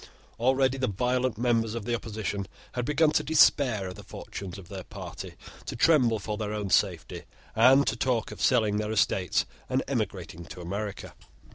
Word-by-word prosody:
Already 130 +2 +2
the 130 - +1
violent 125 +3 0
members 115 -2 +1
of 115 -3 -5
the 120 - -1
opposition 105 -4 -3 0.2
had 125 -1 -3
begun 150 +2 +3
to - - +2
despair 135 -9 +4
of 90 - -6
the - - -11
fortunes 95 -2 -8
of 95 -3 -11
their 95 -1 -7
party, - - -8 0.3
to - - -4
tremble 125 -5 +4
for 105 +1 -4
their 105 -1 -3
own 105 -3 -3
safety, - - +1 0.3
and 130 +5 +6
to 110 - 0
talk 120 -1 0
of - - -9
selling 110 -5 +3
their 105 0 -2
estates 95 -4 +1 0.2
and - - +1
emigrating 85 - -3
to - - -10
America. 100 +4 -5
110 Hz, 175 wpm, -28 LUFS, 100-130 Hz, 0.3 s, and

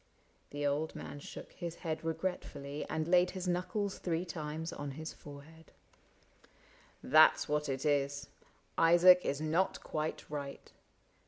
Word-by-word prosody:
The 145 0 -3
old 145 +3 0
man 145 - -7
shook - - -9
his 170 -1 -6
head 160 -1 -2
regretfully 160 -4 -3
And 155 0 -1
laid 180 +1 +5
his 185 -1 -5
knuckles 185 +3 -1
three 170 0 -1
times 160 -1 -5
on 145 0 -5
his 160 0 -6
fore 140 -1 -11
head. 160 +1 -17 0.7
" - - -29
That 155 0 +8
's - - -3
what 150 0 0
it 135 +2 -2
is: 140 -1 +1 0.5
Isaac 175 +2 +7
is 140 - -1
not 160 +5 0
quite 155 0 -3
right. 140 -2 -6
155 Hz, 150 wpm, -33 LUFS, 145-175 Hz, 0.7 s, That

